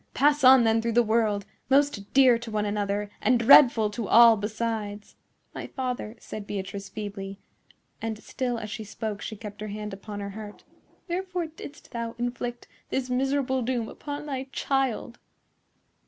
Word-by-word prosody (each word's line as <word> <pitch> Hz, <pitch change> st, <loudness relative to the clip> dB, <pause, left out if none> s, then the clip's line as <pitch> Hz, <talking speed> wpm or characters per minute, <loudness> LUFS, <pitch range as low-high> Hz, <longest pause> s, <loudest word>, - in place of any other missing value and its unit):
Pass 295 Hz, +1 st, +3 dB
on, 260 Hz, -1 st, +8 dB
then, 225 Hz, 0 st, +3 dB
through 230 Hz, 0 st, -1 dB
the 240 Hz, +1 st, +5 dB
world, 215 Hz, -3 st, +1 dB, 0.2 s
most 275 Hz, -7 st, +2 dB
dear 255 Hz, -3 st, +6 dB
to 235 Hz, 0 st, -8 dB
one 210 Hz, -1 st, -1 dB
another 205 Hz, 0 st, -2 dB
and 255 Hz, -, +4 dB
dreadful 235 Hz, -3 st, +7 dB
to 215 Hz, -1 st, -4 dB
all 235 Hz, 0 st, +8 dB
besides!" 210 Hz, -1 st, -4 dB, 0.4 s
"My -, -, -6 dB
father," 250 Hz, -4 st, -4 dB
said 210 Hz, -1 st, -8 dB
Beatrice, 200 Hz, 0 st, -5 dB
feebly,—and 205 Hz, +2 st, -8 dB
still 250 Hz, -2 st, -2 dB
as 215 Hz, -2 st, -6 dB
she 220 Hz, -, -5 dB
spoke 210 Hz, 0 st, -5 dB
she 220 Hz, -, -5 dB
kept 210 Hz, -1 st, -9 dB
her 215 Hz, -, -4 dB
hand 210 Hz, 0 st, -5 dB
upon 205 Hz, +1 st, -7 dB
her 200 Hz, 0 st, -5 dB
heart,—"wherefore 345 Hz, -, -6 dB
didst 310 Hz, -2 st, -11 dB
thou 230 Hz, -1 st, -4 dB
inflict 240 Hz, 0 st, -4 dB, 0.2 s
this 255 Hz, -1 st, -2 dB
miserable 265 Hz, 0 st, +1 dB
doom 240 Hz, -2 st, -1 dB
upon 290 Hz, +4 st, -7 dB
thy 270 Hz, -3 st, -4 dB
child?" 265 Hz, -4 st, -1 dB
230 Hz, 155 wpm, -26 LUFS, 210-255 Hz, 0.4 s, on